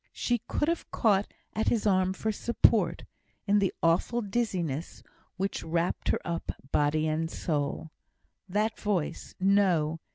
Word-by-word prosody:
She 240 -1 0
could 295 - 0
have 335 0 -1
caught 205 -3 +2 0.2
at 220 - -1
his 225 -3 +1
arm 185 -2 +3
for 220 +3 -2
support, 235 +2 +2 0.4
in 205 0 +4
the 195 -2 +2
awful 170 +8 +2
dizziness 185 - -2 0.3
which 195 +1 -2
wrapped 165 +2 -1
her - - +2
up, 170 -1 -3 0.2
body 150 +1 +2
and 160 +1 -1
soul. 155 -1 -2 0.6
That 215 +3 0
voice! 200 -7 -2
No! 185 -5 +3
190 Hz, 135 wpm, -29 LUFS, 165-210 Hz, 0.6 s, in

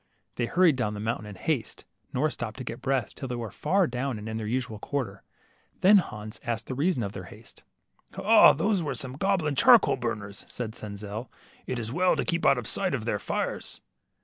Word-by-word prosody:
'' - - -47
They 120 - 0
hurried 170 -4 +4
down 105 -4 -1
the - - -6
mountain 110 0 -2
in 105 - -8
haste, 130 +4 -2 0.3
nor 150 +4 +1
stopped 110 +1 -5
to 130 - -5
get 115 -1 -6
breath, 130 -5 0
till 135 - -6
they 125 - -3
were 115 -3 -5
far 195 - +2
down 125 -2 -2
and 105 +1 -7
in 110 0 -3
their 110 -1 -4
usual 120 -2 -2
quarter; 110 -7 -3 0.6
then 200 +2 +8
Hans 110 - -6
asked 115 -2 -2
the - - -5
reason 145 -1 +1
of 100 - -3
their - - -7
haste. - - -14 0.6
Ah, - - +7
those 195 +5 +1
were 150 - -2
the 130 -1 -4
goblin 185 -6 +1
charcoal 135 - +6
burners," 105 -5 -4
said 115 -3 -5
Senzel. 105 +2 -7 0.4
It 130 - -2
is 115 -1 -3
well 180 +2 +3
to - - -1
keep 170 -2 +1
out 135 - +5
of 125 - -4
sight - - 0
of - - -5
their - - 0
fires." - - -3
125 Hz, 215 wpm, -27 LUFS, 110-145 Hz, 0.6 s, then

